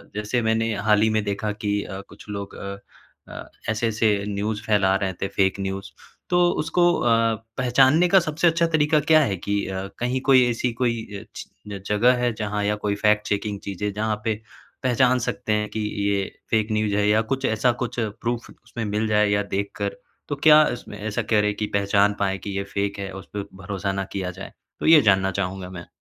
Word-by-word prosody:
जैसे 105 +4 -1
मैंने 110 0 +1
हाल 105 +1 +2
ही 110 - +4
में 110 -1 +1
देखा 105 +1 -2
कि 105 -1 -2
अ, 95 -1 -7
कुछ - - -14
लोग 100 -1 -6
अ 100 0 -6 0.5
अ, - - -9 0.2
ऐसे-ऐसे 110 -2 +1
न्यूज़ 105 +1 -2
फैला 100 -3 +3
रहे 95 -1 -1
थे, 95 +2 -4
फेक 95 0 0
न्यूज़ 95 0 -4 0.4
तो 175 0 +4
उसको 175 +3 +1 0.2
अ, 120 - +1 0.5
पहचानने 130 +7 +4
का 190 +2 +6
सबसे 165 0 0
अच्छा 170 0 +3
तरीका 155 -1 +3
क्या 155 +2 +5
है 100 -5 -1
कि 100 +3 -2
अ, 95 0 -4
कहीं 125 +2 -1
कोई, 130 -2 +5
ऐसी 120 +1 -1
कोई 115 -1 0 0.2
अ, - - -11
ची 100 -1 -9
जगह 110 +5 +4
है, 120 - +2
जहाँ 105 -1 -3
या 105 +1 +1
कोई 100 -1 0
फैक्ट 105 0 +2
चेकिंग 100 0 -2
चीज़ें, 100 +1 -3
जहाँ 110 0 -1
पे 110 -1 +1 0.5
पहचान 130 0 +3
सकते 110 -2 -2
हैं 105 0 0
कि 110 - -5 0.3
ये 100 -1 +1 0.3
फेक 110 -1 +2
न्यूज़ 105 -1 0
है 105 0 +2
या 110 +1 +4
कुछ 135 0 -2
ऐसा 110 +3 +2
कुछ 120 - -4
प्रूफ़ 115 +2 -3
उसमें 115 - -8
मिल 105 +1 -1
जाए 105 -1 +3
या 100 0 +2
देख 100 0 -2
कर? 100 -1 -3 0.3
तो 145 - -1
क्या 155 +1 +7
इसमें, 110 -3 -9
ऐसा 110 +2 -2
करें 105 -1 +3
की 105 0 -2
पहचान 100 0 +3
पाएँ 95 -1 0
की 100 -1 -6
ये 100 - -1
फेक 100 +1 -3
है, 95 0 -4
उस 95 0 -9
पर 100 -1 -4 0.2
भरोसा 95 +1 -3
ना 95 0 -2
किया 95 -2 -3
जाए, 95 +2 -10 0.3
तो - - -4
ये 160 -2 +8
जानना 95 -3 +3
चाहूँगा 90 0 -4
मैं। 90 -2 -9
105 Hz, 205 wpm, -23 LUFS, 100-120 Hz, 0.5 s, ये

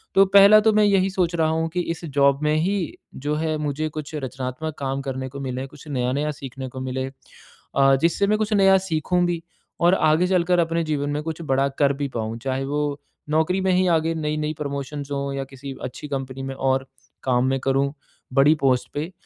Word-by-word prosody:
तो 195 - +7
पहला 200 +2 +9
तो 220 +1 +4
मैं 215 0 +4
यही 195 -2 +3
सोच 180 -3 0
रहा 160 -1 +2
हूँ 160 +1 0
कि 175 +2 -3
इस 170 - -12
ज़ॉब 140 -2 +3
में 150 0 +2
ही 175 +6 +1 0.5
जो 150 +1 +1
हैं 155 0 -1
मुझे 150 +1 -2
कुछ 155 0 -7
रचनात्मक 135 +2 -4
काम 135 0 -2
करने 130 -1 -4
को 140 +2 -8
मिले, 130 0 -3
कुछ 145 +2 -15
नया-नया 140 +2 -1
सीखने 135 -2 -7
को 130 - -8
मिले। 130 0 -3 0.7
अ, 135 0 +5
जिससे 170 +4 +2
मैं 215 +1 +2
कुछ 215 0 0
नया 195 -1 +6
सीखूँ 170 +3 +1
भी 175 -1 -1 0.4
और 175 +1 +5
आगे 160 +1 +3
चलकर 180 -1 +2
अपने 165 0 +1
जीवन 145 -2 -1
में 145 +1 -1
कुछ 160 +1 -5
बड़ा 135 +1 +2
कर 140 -1 +4
भी 140 +1 -3
पाऊँ, 110 0 -3
चाहे 135 +2 -2
वो 145 0 -2 0.3
नौकरी 160 +5 +1
में 190 0 +2
ही 185 0 +3
आगे 165 +1 -1
नई-नई 150 -1 -2
प्रमोशन्स 140 0 -5
हों 140 0 -2
या 135 0 -2
किसी 135 0 -9
अच्छी 130 +4 -6
कंपनी 135 -1 -4
में 135 0 -5
और 135 0 0 0.4
काम 125 -1 +2
मैं 135 0 0
करूँ 135 +1 +1 0.4
बड़ी 140 +3 +5
पोस्ट 130 -2 +2
पे। 155 +5 -3
150 Hz, 205 wpm, -23 LUFS, 135-165 Hz, 0.7 s, पहला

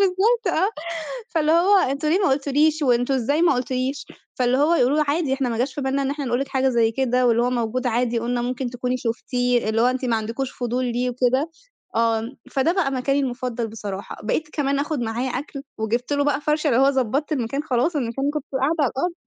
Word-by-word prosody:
بالضبط 400 +4 +2
آه 375 +4 +3 0.6
فاللي 315 -2 +1
هو 360 +5 +5
أنتم 280 0 0
ليه 335 +5 +3
ما 395 - +2
قُلتوليش 295 +3 +2
وأنتم 245 0 +2
إزاي 285 +6 +1
ما 345 - +5
قٌلتوليش؟ 255 +2 -2 0.3
فاللي 250 0 +1
هو 305 +4 +4
يقولوا 275 -2 +3
لي 305 - +3
عادي 290 -2 +1
إحنا 270 -2 -1
ما 230 -1 -2
جاش 255 +3 -1
في - - -4
بالنا 270 +1 0
إن 270 - -1
إحنا 285 0 -3
نقول 245 0 0
لِك 275 - -3
حاجة 265 0 +1
زي 235 -3 +2
كده، 255 0 +1
واللي 235 0 +3
هو 245 - +1
موجود 245 +1 -1
عادي 240 0 +1
وقُلنا 240 +1 -1
ممكن 250 0 -3
تكوني 250 +1 -2
شُفتيه، 245 0 0
اللي 220 +1 +1
هو - - +5
أنتِ 255 +1 0
ما 235 -2 +1
عندكوش 230 +4 -3
فضول 245 +1 -2
ليه 245 +1 -1
وكده 255 +5 +1 0.5
آه، 230 -1 +2 0.3
فده 275 +4 +2
بقى 360 -7 +1
مكاني 275 +2 +1
المفضل 245 -3 -3
بصراحة 205 -3 -6
بقيت 305 +8 -1
كمان 280 -2 0
آخد 290 -1 -2
معايا 235 +3 -2
أكل 275 +2 -5 0.2
وجِبت 235 +5 -1
له 285 0 +2
بقى 290 -1 +1
فَرشة، 300 +1 0
اللي 250 -2 +3
هو 270 +1 +5
ضبطت 270 +3 -1
المكان 275 +1 -1
خلاص 300 +3 0
المكان 270 +2 -1
كنت 300 -3 -3 0.2
قاعدة 280 +5 +2
على 280 - +2
الأرض 345 +7 -2
260 Hz, 220 wpm, -23 LUFS, 245-290 Hz, 0.6 s, هو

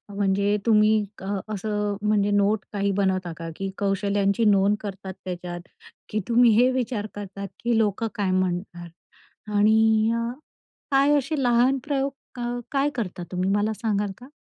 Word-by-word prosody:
म्हणजे 200 +1 +1
तुम्ही, 215 -1 +5 0.3
अ, - - -7 0.3
असं 210 0 -2
अ, - - -6
म्हणजे 205 -1 +2
नोट 205 0 +2
काही 200 -1 0
बनवता 190 -3 0
का, 165 0 -6
की 195 +2 -4
कौशल्यांची 200 +1 +1
नोंद 200 0 +4
करतात 195 -2 -7
त्याच्यात? 175 -1 -5 0.5
की 215 - -1
तुम्ही 235 0 +5
हे 250 - +5
विचार 240 -4 -2
करतात, 200 -1 -6 0.2
की 235 -1 +2
लोकं 220 0 +1
काय 200 -3 0
म्हणणार? 175 -1 -2 0.7
आणि 220 +1 +4
अ, 230 0 -1 0.6
काय 280 +2 +4
असे 285 +1 -1
लहान 245 +2 +3
प्रयोग, 280 -1 -1 0.3
अ, 240 0 -2
काय 280 +1 +2
करता 185 -7 -4
तुम्ही, 185 +1 -1
मला 205 +2 +1
सांगाल 205 -2 0
का? 250 - -13
205 Hz, 155 wpm, -24 LUFS, 195-230 Hz, 0.7 s, तुम्ही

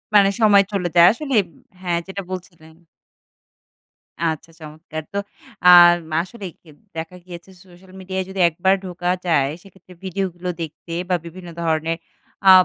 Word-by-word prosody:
মানে 200 -1 +7
সময় 200 -2 +6
চলে 185 -3 -1
যায়। 170 0 +8
আসলেই 260 -3 +1
ব - - -22 0.3
হ্যাঁ 175 -2 0
যেটা 195 +1 -5
বলছিলেন। 170 -3 -9 1.5
আচ্ছা 165 0 -2
চমৎকার। 155 0 -8
তো - - -2 0.5
আম 175 -1 +9 0.2
আসলেই 190 -1 -8
কিন্তু 155 +5 -19
দেখা 160 +3 -5
গিয়েছে 175 0 -11 0.2
সোশ্যাল 185 +1 -18
মিডিয়ায় 190 0 -4
যদি 190 0 -6
একবার 185 +4 +2
ঢোকা 180 0 -3 0.2
যায়, 140 -6 +2
সেক্ষেত্রে 190 -1 -17
ভিডিও 190 +1 -2
গুলো 180 +1 -5
দেখতে 165 +1 -7 0.2
বা 180 - +3
বিভিন্ন 175 +1 -10
ধরনের 160 0 0 0.5
আ - - +11
175 Hz, 145 wpm, -21 LUFS, 165-190 Hz, 1.5 s, আ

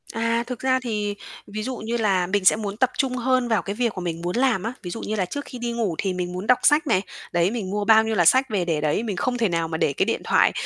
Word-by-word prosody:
À, 230 +1 0
thực 250 -2 -5
ra 260 0 +2
thì, 210 -4 -2 0.3
ví 215 +1 -5
dụ 255 +1 -4
như 230 +2 -3
là 195 -5 +1
mình 195 0 0
sẽ - - +7
muốn 210 -1 -5
tập 255 +1 +3
trung 265 -2 0
hơn 255 0 +1
vào 225 -2 +1
cái 200 - -5
việc 235 0 0
mà 185 - -4
mình 170 -2 -4
muốn 175 +1 -3
làm 245 -6 +2
á. 230 +3 -3
Ví 175 - -5
dụ 225 - -5
như 215 - -3
là 195 -3 0
trước 285 +11 -6
khi 255 - -9
đi 240 0 -3
ngủ 225 -7 -1
thì 190 -2 -1
mình 180 -1 -4
muốn 185 +3 -5
đọc 250 - +5
sách 300 +1 +4
này, 190 -7 +3 0.3
đấy, 175 +2 +2
mình 220 -5 -4
mua 205 +1 -2
bao 220 0 +6
nhiêu 220 0 -1
là 175 - +3
sách 260 +8 +5
về 195 -5 0
để 160 -3 -1
đấy, 155 +8 0
mình 215 -4 -3
không 245 +7 -1
thể 225 -4 +1
nào 165 -1 0
mà 160 0 -3
để 140 - +1
cái - - +1
điện - - -1
thoại - - +3
215 Hz, 310 wpm, -23 LUFS, 185-240 Hz, 0.3 s, sẽ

